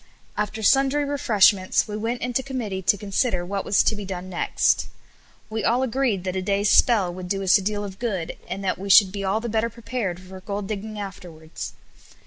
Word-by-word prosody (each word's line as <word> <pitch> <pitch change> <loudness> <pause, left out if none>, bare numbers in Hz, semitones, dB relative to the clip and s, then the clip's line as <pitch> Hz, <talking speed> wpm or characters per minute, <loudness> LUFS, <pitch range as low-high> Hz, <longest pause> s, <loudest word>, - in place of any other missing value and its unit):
After 210 +1 -3
sundry 275 +4 +3
refreshments 215 -9 +3
we 210 - -5
went 230 +3 -3
into 250 +1 0
committee 240 -8 -4
to 195 +2 +2
consider 200 -2 -1
what 195 +1 -3
was 200 - +3
to 220 - +2
be 205 - -6
done 185 -1 -6
next. 175 - +1 0.6
We 220 0 -3
all 245 +3 +2
agreed 250 -6 0
that 185 -1 -3
a 190 - -1
day's 200 +1 +1
spell 200 -8 +4
would 180 0 -7
do 195 0 -1
us 190 +2 +5
a - - -5
deal 205 +1 -2
of 195 -1 -8
good, 195 -9 -3
and 195 +2 -5
that 185 -2 -1
we 200 +1 -6
should 195 0 +7
be 200 0 -5
all 195 +3 +1
the 235 - -5
better 225 +1 0
prepared 230 -5 -4
for 185 0 -11
gold 200 0 -4
digging 215 +1 -5
afterwards. 180 -6 -8
205 Hz, 205 wpm, -24 LUFS, 190-225 Hz, 0.6 s, should